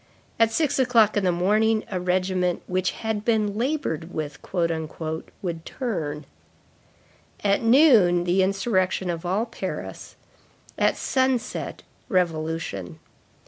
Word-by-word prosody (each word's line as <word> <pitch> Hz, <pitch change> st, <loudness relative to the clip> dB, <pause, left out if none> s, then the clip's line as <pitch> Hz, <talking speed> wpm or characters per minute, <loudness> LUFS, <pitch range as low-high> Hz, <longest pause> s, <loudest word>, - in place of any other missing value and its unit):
At 225 Hz, -1 st, +4 dB
six 290 Hz, +3 st, +1 dB
o'clock 235 Hz, -5 st, +4 dB
in 205 Hz, -, +1 dB
the 180 Hz, -, +3 dB
morning 215 Hz, +5 st, +2 dB
a 185 Hz, -, -1 dB
regiment 180 Hz, 0 st, 0 dB
"which 185 Hz, 0 st, 0 dB
had 220 Hz, +2 st, -3 dB
been 215 Hz, -3 st, +1 dB
labored 230 Hz, -, -2 dB
with," 150 Hz, -3 st, -5 dB, 0.2 s
would 165 Hz, +1 st, -4 dB
turn; 155 Hz, -, -4 dB, 1.2 s
at 200 Hz, -1 st, +2 dB
noon, 225 Hz, -, +5 dB
the 180 Hz, +2 st, +2 dB
insurrection 190 Hz, -2 st, +1 dB
of 170 Hz, +1 st, -5 dB
all 200 Hz, +6 st, +1 dB
Paris; -, -, -6 dB, 0.6 s
at -, -, +2 dB
sunset, 260 Hz, -2 st, -1 dB, 0.3 s
revolution. 160 Hz, -, -1 dB
185 Hz, 110 wpm, -24 LUFS, 170-225 Hz, 1.2 s, noon